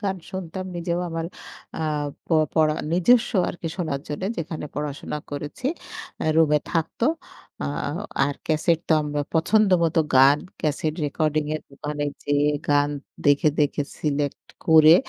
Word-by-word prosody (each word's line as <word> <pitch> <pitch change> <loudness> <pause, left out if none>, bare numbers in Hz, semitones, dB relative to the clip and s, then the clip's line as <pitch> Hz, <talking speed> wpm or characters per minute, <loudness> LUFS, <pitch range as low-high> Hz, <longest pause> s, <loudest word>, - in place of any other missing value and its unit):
গান 195 -2 -1
শুনতাম 185 0 -5
নিজেও 170 0 -1
আমার 165 0 -3 0.5
আ - - -4 0.5
প - - -31 0.3
পড়া 155 -1 +4 0.2
নিজস্ব 225 +7 +4 0.2
আরকি 170 -1 -5
শোনার 160 -6 -2
জন্য 150 +4 -4 0.2
যেখানে 160 -2 -4
পড়াশোনা 150 0 -4
করেছি। 145 - -5 0.6
আ - - -1
রুমে 150 -2 +5
থাকত। 165 -1 -2 0.6
আ - - -1 0.6
আর 140 0 -1
ক্যাসেট 160 +1 +2
তো - - +5
আমরা 150 0 -2
পছন্দ 205 +5 +4
মতো 165 0 +3
গান 135 +3 +7 0.2
ক্যাসেট 155 0 0
রেকর্ডিং 155 +1 0
এর 155 - -4
দোকানে 145 +1 -4 0.2
যেয়ে 145 +1 +2 0.2
গান 145 0 +3 0.3
দেখে, 145 +2 +5
দেখে 145 0 +2 0.2
সিলেক্ট 145 -1 -2 0.2
করে 160 0 +8
155 Hz, 140 wpm, -24 LUFS, 145-165 Hz, 0.6 s, করে